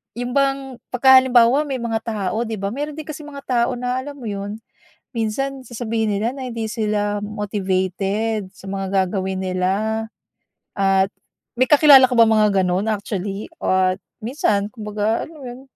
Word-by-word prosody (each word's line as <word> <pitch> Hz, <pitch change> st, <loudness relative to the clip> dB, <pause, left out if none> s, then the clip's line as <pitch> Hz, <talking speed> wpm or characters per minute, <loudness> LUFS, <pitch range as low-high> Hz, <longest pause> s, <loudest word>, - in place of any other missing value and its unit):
'yung 245 Hz, +1 st, -4 dB
bang 270 Hz, -2 st, 0 dB
kapagka 260 Hz, +1 st, +7 dB
halimbawa 260 Hz, +3 st, +4 dB
may 265 Hz, -3 st, -3 dB
mga 225 Hz, -1 st, -1 dB
tao 215 Hz, +1 st, -2 dB
'di 220 Hz, -, -3 dB
ba, 200 Hz, 0 st, -3 dB
meron 290 Hz, +4 st, -4 dB
din 310 Hz, -, -6 dB
kasing 300 Hz, 0 st, -8 dB
mga 280 Hz, -1 st, -9 dB, 0.2 s
tao -, -, -2 dB
na 250 Hz, +1 st, -2 dB
alam 285 Hz, +2 st, -7 dB
mo 275 Hz, -, -12 dB
iyun, 205 Hz, +2 st, -5 dB, 0.6 s
minsan 265 Hz, +5 st, -2 dB
sasabihin 225 Hz, -3 st, -2 dB
nila 225 Hz, +3 st, 0 dB
na 260 Hz, -2 st, -5 dB
hindi 230 Hz, -1 st, -3 dB
sila 210 Hz, -2 st, -1 dB
motivated 200 Hz, 0 st, -2 dB
sa 195 Hz, -, -14 dB
mga 195 Hz, 0 st, -3 dB, 0.2 s
gagawin 190 Hz, 0 st, -3 dB
nila. 190 Hz, +4 st, -1 dB, 0.7 s
At 195 Hz, -1 st, +3 dB, 0.5 s
may 255 Hz, +2 st, +2 dB
kakilala 285 Hz, -3 st, +8 dB
ka -, -, 0 dB
bang 230 Hz, -, +7 dB
mga 215 Hz, -1 st, +4 dB
ganu'n 185 Hz, +3 st, 0 dB
actually 200 Hz, -1 st, -3 dB, 0.2 s
at, 185 Hz, 0 st, +2 dB, 0.2 s
minsan 215 Hz, -4 st, 0 dB
kumbaga 210 Hz, 0 st, -1 dB
alam 325 Hz, -, -14 dB
mo -, -, -12 dB
iyun, 245 Hz, +1 st, -8 dB
220 Hz, 165 wpm, -21 LUFS, 200-255 Hz, 0.7 s, kakilala